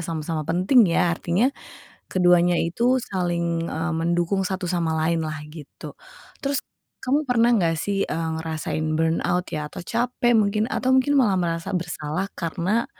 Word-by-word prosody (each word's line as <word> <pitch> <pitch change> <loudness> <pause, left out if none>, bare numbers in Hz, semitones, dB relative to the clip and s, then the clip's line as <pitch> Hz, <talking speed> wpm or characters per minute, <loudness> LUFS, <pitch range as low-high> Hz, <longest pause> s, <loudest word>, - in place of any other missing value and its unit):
sama-sama 160 -1 -3
penting 185 +6 +4
ya. 170 0 +2
Artinya, 190 +11 +1 0.6
keduanya 175 -1 +4
itu 235 +11 +1
saling, 170 -6 -2
eee, 165 +2 -2
mendukung 170 +3 0
satu 190 0 -3
sama 170 -2 0
lainlah 160 -2 -1 0.2
gitu. 150 -4 -10 0.5
Terus, 280 0 0 0.4
kamu 285 +4 +1
pernah 240 -1 +4
nggak 165 -6 +2
sih, 200 -1 -1
eee, 165 0 -3
ngerasain 160 -1 -3
burnout 165 +2 +1
ya 150 -1 -2
atau - - -8
capek 240 +1 +1
mungkin 210 +1 +2
atau 260 - -1
mungkin 260 +2 +2
malah 210 -8 +3
merasa 165 -1 -2
bersalah 160 0 -3
karena, 185 +7 -1
175 Hz, 145 wpm, -23 LUFS, 165-210 Hz, 0.6 s, penting